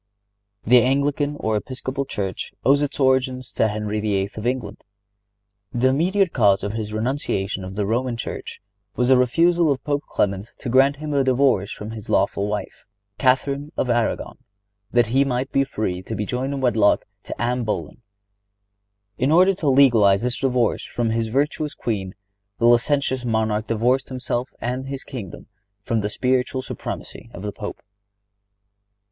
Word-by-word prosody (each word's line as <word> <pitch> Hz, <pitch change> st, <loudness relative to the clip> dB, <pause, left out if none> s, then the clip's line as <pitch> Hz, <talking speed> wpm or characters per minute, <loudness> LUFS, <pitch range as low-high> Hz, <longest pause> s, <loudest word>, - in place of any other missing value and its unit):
The 125 Hz, +2 st, +6 dB
Anglican 140 Hz, +3 st, +1 dB
or 110 Hz, 0 st, 0 dB
Episcopal 130 Hz, +4 st, -3 dB
Church 95 Hz, -7 st, -4 dB
owes 140 Hz, +1 st, +5 dB
its 145 Hz, 0 st, -2 dB
origin 130 Hz, -1 st, +2 dB
to 110 Hz, -, +2 dB
Henry 105 Hz, 0 st, -2 dB
VIII. 100 Hz, -2 st, -1 dB
of 110 Hz, +2 st, -3 dB
England. 125 Hz, -4 st, -3 dB, 0.9 s
The 125 Hz, +2 st, +2 dB
immediate 180 Hz, +7 st, +2 dB
cause 100 Hz, -5 st, +3 dB
of 105 Hz, -, -2 dB
his 110 Hz, -1 st, -4 dB
renunciation 110 Hz, -4 st, -2 dB
of 95 Hz, +1 st, -7 dB
the 105 Hz, 0 st, -1 dB
Roman 120 Hz, +3 st, -1 dB
Church -, -, -6 dB, 0.4 s
was 125 Hz, 0 st, +1 dB
the 130 Hz, -, +7 dB
refusal 165 Hz, +6 st, +3 dB
of 135 Hz, -2 st, -2 dB
Pope 145 Hz, -1 st, 0 dB
Clement 100 Hz, +2 st, -1 dB
to -, -, -5 dB
grant 135 Hz, +3 st, +4 dB
him 150 Hz, +1 st, -5 dB
a 140 Hz, -1 st, +3 dB
divorce 130 Hz, -6 st, +2 dB
from 105 Hz, +1 st, -7 dB
his 110 Hz, -2 st, -9 dB
lawful 100 Hz, +1 st, +1 dB
wife, 105 Hz, -1 st, -5 dB, 0.3 s
Catharine 140 Hz, +3 st, +1 dB
of 125 Hz, -, +1 dB
Aragon, 120 Hz, -1 st, -1 dB, 0.5 s
that 120 Hz, 0 st, +3 dB
he 135 Hz, +1 st, +5 dB
might 130 Hz, 0 st, -2 dB
be 135 Hz, -, +3 dB
free 105 Hz, -9 st, -3 dB
to 110 Hz, +4 st, -6 dB
be 105 Hz, +1 st, -2 dB
joined 130 Hz, +5 st, -2 dB
in 135 Hz, -, -4 dB
wedlock 110 Hz, -5 st, +3 dB, 0.2 s
to -, -, -7 dB
Anne 125 Hz, +1 st, 0 dB
Boleyn. 110 Hz, +1 st, -4 dB, 1.2 s
In 130 Hz, +4 st, +2 dB
order 185 Hz, +4 st, +6 dB
to 155 Hz, -5 st, -1 dB
legalize 115 Hz, -7 st, +5 dB
his 125 Hz, 0 st, 0 dB
divorce 125 Hz, -4 st, +1 dB
from 115 Hz, -2 st, -2 dB
his 115 Hz, 0 st, 0 dB
virtuous 145 Hz, +5 st, -1 dB
queen 95 Hz, -5 st, -3 dB, 0.4 s
the 115 Hz, -, +1 dB
licentious 130 Hz, +2 st, +3 dB
monarch 110 Hz, -2 st, 0 dB
divorced 125 Hz, +4 st, +1 dB
himself 125 Hz, -1 st, -3 dB
and 125 Hz, +3 st, -3 dB
his 135 Hz, 0 st, -5 dB
kingdom 115 Hz, -10 st, -8 dB, 0.4 s
from 115 Hz, +1 st, 0 dB
the 105 Hz, -, -2 dB
spiritual 130 Hz, +2 st, 0 dB
supremacy 115 Hz, -, -7 dB
of 90 Hz, -, -8 dB
the 105 Hz, -, -3 dB
Pope. 105 Hz, 0 st, -7 dB
125 Hz, 165 wpm, -22 LUFS, 110-135 Hz, 1.2 s, the